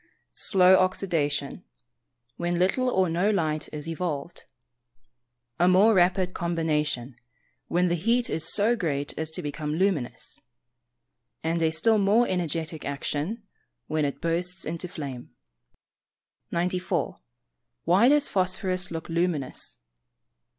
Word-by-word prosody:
slow 185 -1 +6
oxydation, 165 -7 0 0.7
when 175 0 -1
little 195 +8 +2
or 190 -5 +2
no 175 +5 +1
light 155 -7 -1
is 150 0 -6
evolved; 165 -2 -4 1.1
a 175 - +4
more 195 +5 +6
rapid 180 0 +2
combination, 150 -7 -1 0.5
when 180 +1 +2
the 175 - +1
heat 230 +8 +1
is 160 - +1
so 220 +4 +3
great 145 -8 -1
as 160 0 -3
to 175 +2 -4
become 150 +1 -3
luminous; 170 -8 -1 1.0
and 165 +1 0
a 160 - +3
still 215 +7 +2
more 210 +5 +3
energetic 165 -3 -2
action, 150 - -3 0.4
when 155 -1 -1
it 140 -1 -2
bursts 180 +3 -2
into 165 +3 -4
flame. 140 -8 -8 1.1
94. 180 +1 -1 0.7
_Why 195 +9 +5
does 295 0 +4
phosphorous 185 -1 0
look 165 -1 -6
luminous? 165 -5 -2
175 Hz, 115 wpm, -26 LUFS, 155-185 Hz, 1.1 s, slow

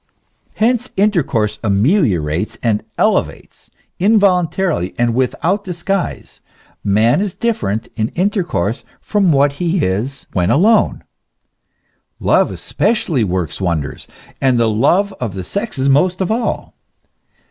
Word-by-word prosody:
Hence 245 +2 +1
intercourse 145 - +1
ameliorates 105 - +1
and 110 -3 +1
elevates; - - -1 0.3
involuntarily 185 - +2
and 120 -1 +1
without 165 - 0
disguise, 180 +1 -3 0.4
man 110 - +3
is 200 -3 -3
different 110 - -1
in 110 -2 0
intercourse 175 - -1 0.2
from 200 -5 +1
what 140 0 +3
he 175 -1 +1
is 115 +9 -3
when 90 -1 +1
alone. 210 +9 +3 1.2
Love - - +3
especially 165 - 0
works 90 -2 -2
wonders, 85 -6 -2 0.3
and 130 -2 +3
the 115 - +3
love 175 - +2
of 115 -6 -4
the 95 - -4
sexes 170 - -3
most 175 +7 +3
of 190 +1 -1
all. 230 +1 -2
140 Hz, 115 wpm, -17 LUFS, -, 1.2 s, man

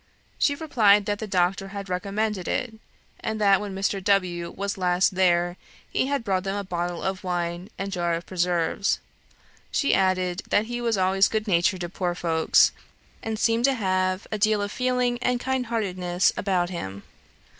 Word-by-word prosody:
She 285 - +3
replied 215 -10 +4
that 205 0 -1
the 220 - -4
doctor 190 0 +1
had 200 0 -7
recommended 200 +1 -2
it, 250 -3 -1 0.5
and 220 0 -3
that 200 -2 +4
when 200 -2 -5
Mr. 195 0 -1
W. 180 -4 +1
was 200 +2 -3
last 180 -1 +2
there, 175 -1 +2 0.3
he - - +1
had 280 -3 -1
brought 190 -4 0
them 195 0 -2
a 205 - -2
bottle 175 -2 -3
of 190 0 -2
wine 175 +1 -3
and 195 +1 -4
jar 175 -2 0
of 170 - -6
preserves. 180 +1 0 0.7
She 280 - +2
added, 185 -1 +1
that 210 - +3
he 240 +1 -4
was 230 -3 +1
always 190 +1 +3
good 220 0 -2
natured 180 0 +2
to 175 - -3
poor 180 -1 -2
folks, 165 -2 +3 0.5
and 220 -1 -3
seemed 230 +2 +2
to 275 -1 +3
have 185 -3 0
a 215 - -2
deal 215 0 +2
of 205 - -4
feeling 250 -1 0
and 250 0 +1
kindheartedness 215 -9 0
about 185 -3 0
him. 100 - -6
195 Hz, 175 wpm, -25 LUFS, 180-215 Hz, 0.7 s, replied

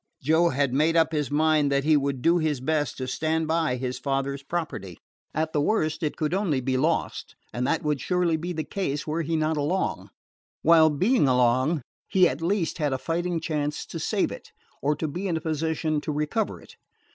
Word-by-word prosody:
Joe 160 +5 +3
had 140 -2 0
made 155 +4 +2
up 165 - +3
his 150 -3 -1
mind 150 -1 +2
that 140 0 +2
he 155 +1 +4
would 140 -3 -1
do 170 +1 +4
his 155 -4 0
best 145 +1 -1
to 130 - -4
stand 160 +4 -1
by 160 -5 +1
his 125 0 -4
father's 140 0 -2
property. 140 - -4 0.3
At 155 +1 -2
the 150 - +2
worst, 155 -3 0
it 155 -2 -2
could 155 +1 -1
only 185 -8 +1
be 130 +1 -1
lost; 155 +6 -1 0.2
and 125 +2 -1
that 165 - 0
would 150 -2 0
surely 180 -3 +1
be 170 +3 -4
the 160 -2 -3
case 150 -4 -3
were 160 +2 -1
he 165 +1 -1
not 155 0 0
along, 155 +6 -1 0.5
while, 160 -1 +6
being 185 - +2
along, 130 +4 +2 0.2
he 185 -2 +4
at 140 0 -4
least 170 -1 -1
had 145 -3 +1
a - - 0
fighting 170 +4 -2
chance 150 -2 -2
to - - -7
save - - 0
it, - - -10 0.3
or 150 +3 +1
to 160 - -3
be 180 +7 -4
in 165 -3 0
position 160 -1 -1
to 150 - -3
recover 150 +9 -1
it. - - -17
155 Hz, 205 wpm, -26 LUFS, 140-165 Hz, 0.5 s, while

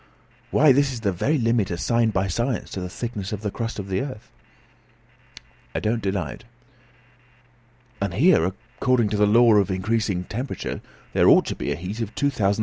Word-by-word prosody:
"Why, 150 -1 +5
this 140 +1 +3
is 120 -3 -6
the 100 -3 +1
very 140 - 0
limit 115 -5 +1
assigned 115 +6 +1
by 95 -1 0
science 120 +6 -2
to 95 - -4
the 90 - -5
thickness 105 -1 -5
of 105 -1 -4
the 105 -2 -3
crust 115 +3 -4
of 100 -2 -5
the 95 0 -1
earth." 130 -6 -7 1.4
"I - - +1
don't 115 +2 -1
deny 95 -6 -2
it." - - -11 1.6
"And 100 -4 -2
here, 145 - +5
according 120 +4 -1
to 105 - -1
the 105 0 +4
law 115 +2 +6
of 100 -1 +2
increasing 95 0 -1
temperature, 125 +9 -5 0.3
there - - +5
ought - - +6
to - - -3
be - - -3
a - - 0
heat 95 +6 -6
of 110 -1 -5
2,732° 140 -1 +1
Fahr.!" 100 -3 +1
110 Hz, 190 wpm, -23 LUFS, 95-120 Hz, 1.6 s, law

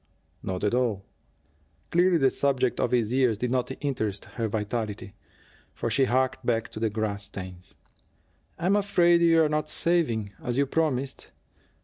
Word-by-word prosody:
"Not 95 0 -4
at 105 - +1
all." 115 -6 0 0.9
Clearly 175 +1 +4
the 135 -4 +3
subject 130 -3 0
of - - +1
his 120 -2 +1
years 125 -5 +2
did 125 +3 -2
not 130 0 0
interest 110 -8 -2
her 115 -2 -3
vitally, 105 -1 -3 0.6
for 115 - -3
she 135 +4 +3
harked 130 +1 0
back 115 -1 0
to - - -7
the 110 0 +1
grass 105 -1 -3
stains. 95 -2 -9 0.8
"I'm 185 +4 +2
afraid 175 -4 +3
you're 165 -2 +5
not 150 0 -1
saving, 120 - 0
as 125 -3 -2
you 140 - +3
promised. 140 -3 -1
125 Hz, 150 wpm, -26 LUFS, 110-150 Hz, 0.9 s, you're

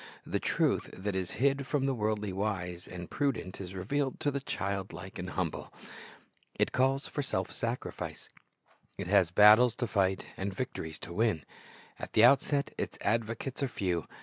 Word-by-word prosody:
The - - -1
truth - - +1
that 100 +1 -2
is 95 -1 -2
hid 140 +1 +2
from 140 -2 +1
the 135 - +2
worldly 105 -3 -1
wise 95 -3 -3
and 90 -1 -7
prudent 130 -10 -2
is 95 0 -7
revealed 135 +9 -1
to 145 - +1
the 140 - -1
child 100 -7 -3
like 90 +4 -8
and 90 0 -4
humble. 90 -3 -3 0.8
It - - +1
calls 135 +2 +2
for 145 - -3
self 95 -9 -2
sacrifice. 120 +2 -4 0.7
It - - -4
has 95 -2 +4
battles 105 +6 +7
to 125 - -1
fight 95 -4 +1
and 95 0 -3
victories 80 -10 -4
to 85 - -7
win. 105 - +1 0.6
At - - -7
the 110 - +6
outset 140 +2 +3
its - - -3
advocates 115 +5 -1
are 140 - +2
few. 90 -8 -2
105 Hz, 170 wpm, -31 LUFS, 95-130 Hz, 0.8 s, battles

